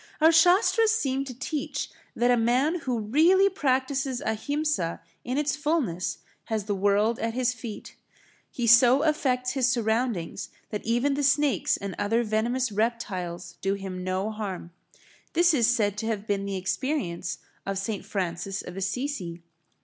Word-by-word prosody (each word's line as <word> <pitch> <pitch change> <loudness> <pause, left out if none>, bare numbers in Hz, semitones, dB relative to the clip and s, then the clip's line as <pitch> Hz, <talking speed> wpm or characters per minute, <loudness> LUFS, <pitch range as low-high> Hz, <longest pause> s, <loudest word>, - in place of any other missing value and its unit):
Our 320 +1 +6
Shastras 370 +7 +5
seem 275 -11 0
to 255 -3 -8
teach 295 +2 -3 0.3
that 245 +1 +3
a - - +5
man 255 +9 +2
who 255 -5 -2
really 325 - +4
practises 265 -5 0
Ahimsa 265 - -1 0.2
in 250 +2 -2
its 290 -2 +1
fulness 290 - -1 0.3
has 220 -2 -2
the 205 +1 -2
world 205 +3 +2
at 225 0 -2
his 250 -1 +1
feet; 225 -3 -8 0.5
he 240 - -3
so 245 +4 +6
affects 255 -5 +1
his 260 -2 +2
surroundings 225 -6 -1 0.2
that 210 - -4
even 240 +5 +1
the 285 - -1
snakes 280 - +2
and 200 -1 -5
other 225 +4 +1
venomous 230 +3 0
reptiles 185 -6 -3
do 195 +1 0
him 190 -2 -6
no 185 +3 -1
harm. 195 -5 -5 0.6
This 345 0 +4
is 240 -6 +3
said 210 -5 +1
to 220 - -3
have 215 -2 -2
been 200 -2 -1
the 195 -1 -3
experience 190 - -2 0.3
of 195 0 -3
St. 200 +1 -3
Francis 190 0 -3
of 180 - -9
Assisi. 195 -4 -3
235 Hz, 155 wpm, -26 LUFS, 200-275 Hz, 0.6 s, Our